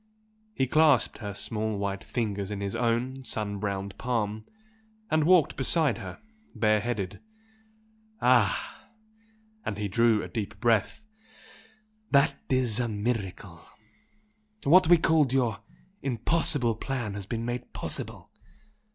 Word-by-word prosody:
He 130 - +2
clasped 150 -4 +3
her 105 -3 -6
small 110 0 -2
white 100 -1 -3
fingers 105 -5 -3
in 105 -1 -4
his 100 +2 -3
own 120 +3 -1
sun 105 -4 -3
browned 100 -1 -3
palm 110 -3 -2 0.6
and 155 -1 +3
walked 175 -3 +4
beside 145 0 +2
her - - -8 0.4
bare 110 -1 +3
headed. 105 -5 -3 1.0
"Ah!" 120 -6 +2 0.8
And 100 - -3
he 105 0 -2
drew 115 +1 +3
a - - -5
deep 110 -4 -5
breath 115 - +1 1.1
"That 140 0 +4 0.2
is 125 -4 +1
a 120 - 0
miracle! 100 -5 -3 1.0
What 170 +4 +6
we 175 +1 +7
called 160 -4 +3
your 120 -5 +1 0.4
'impossible' 125 -1 +1
plan 120 -5 -3
has 100 -1 -6
been 115 +1 -3
made 120 +1 -4
possible! - - -3
115 Hz, 125 wpm, -28 LUFS, 105-130 Hz, 1.1 s, we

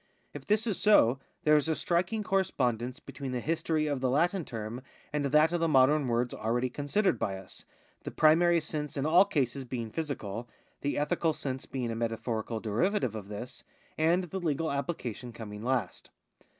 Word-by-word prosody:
If - - -9
this 210 +2 +2
is 215 -5 0
so, 135 - +5 0.2
there 150 -2 +5
is 150 +1 +2
a 160 - +2
striking 180 +8 0
correspondence 125 - 0
between 135 -3 -7
the 125 - -1
history 160 +2 0
of 145 -3 -1
the 130 - +1
Latin 170 +7 +2
term 115 +1 -5 0.3
and 150 -1 0
that 150 +3 +4
of 175 - +1
the 165 - +2
modem 145 0 +4
words 120 +1 0
already 120 +3 -1
considered 145 - 0
by 95 - -1
us, 95 - -11 0.4
the - - -5
primary 170 +2 +4
sense 150 -2 -5
in 140 - -1
all 175 +5 +6
cases 140 - -1
being 120 -3 -5
physical, 120 -8 -4 0.3
the 145 - -1
ethical 155 +2 +1
sense 130 -3 -5
being 125 -3 -3
a - - -3
metaphorical 115 0 -2
derivative 125 - 0
of 105 -3 -7
this, 105 +4 -7 0.3
and 170 +4 +2
the 185 +2 -5
legal 160 -2 -1
application 130 -5 -4
coming 105 -2 -8
last. 120 -4 -2
140 Hz, 175 wpm, -30 LUFS, 120-165 Hz, 0.4 s, all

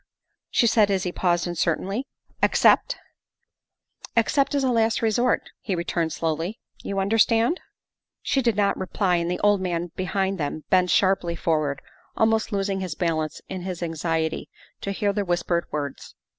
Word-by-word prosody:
she - - +3
said 220 -2 +4
as 190 -2 +1
he 180 - -2
paused 175 -1 +1
uncertainly, 180 - -1 0.2
" - - -37
ex - - +2
cept?" - - +5 0.4
' - - -56
' - - -18
Except 275 +5 +2
as 280 - +1
a 260 - +2
last 225 -1 +2
resort, 235 +3 +2
' - - -59
' - - -64
he 195 - -2
returned 170 -1 -1
slowly. 165 +5 -2
' - - -64
' - - -21
You 200 - -4
understand? 225 - +3 0.2
' - - -65
' - - -64
She 270 - +3
did 235 -4 +1
not 200 -1 +1
reply, 185 -1 +1
and 170 0 -1
the 180 - -2
old 205 -1 +3
man 175 -2 -2
behind 190 0 -1
them 150 +1 -3
bent 180 -1 +4
sharply 185 -3 +2
forward, 155 -4 -1 0.3
almost 220 0 +2
losing 195 -1 -1
his 185 -4 -4
balance 160 -3 -1
in 190 -1 -5
his 180 -1 -4
anxiety 165 -1 -2 0.3
to 200 - -3
hear 200 +1 0
the 205 0 0
whispered 175 -1 0
words. 145 -2 -5
190 Hz, 190 wpm, -24 LUFS, 170-215 Hz, 0.4 s, cept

